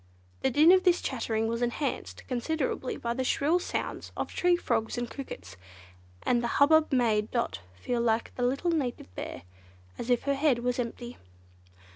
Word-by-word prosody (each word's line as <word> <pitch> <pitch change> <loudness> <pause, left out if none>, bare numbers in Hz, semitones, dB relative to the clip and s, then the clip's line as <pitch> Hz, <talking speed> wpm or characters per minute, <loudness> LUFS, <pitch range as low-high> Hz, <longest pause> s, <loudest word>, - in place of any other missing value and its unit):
The 265 - +2
din 300 +6 +6
of 370 0 +5
this 360 -1 +4
chattering 225 -3 -1
was 230 +1 -2
enhanced 240 +4 -2
considerably 260 +1 -2
by 235 0 -2
the 260 +2 -2
shrill 300 +7 +2
sounds - - -4
of - - -2
tree 355 0 +3
frogs 230 -9 -1
and 240 0 -2
crickets, 95 - -8 0.7
and 240 -1 +2
the 235 - -1
hubbub 310 +2 +5
made 225 -5 +2
Dot 235 -1 -1 0.2
feel 235 - -2
like 230 -1 0
the - - -6
little 275 +8 +1
Native 255 - -2
Bear—as 90 - -10
if 245 -1 +2
her 280 - +1
"head 275 -2 +2
was 250 0 0
empty." 240 0 -5
245 Hz, 165 wpm, -29 LUFS, 230-285 Hz, 0.7 s, din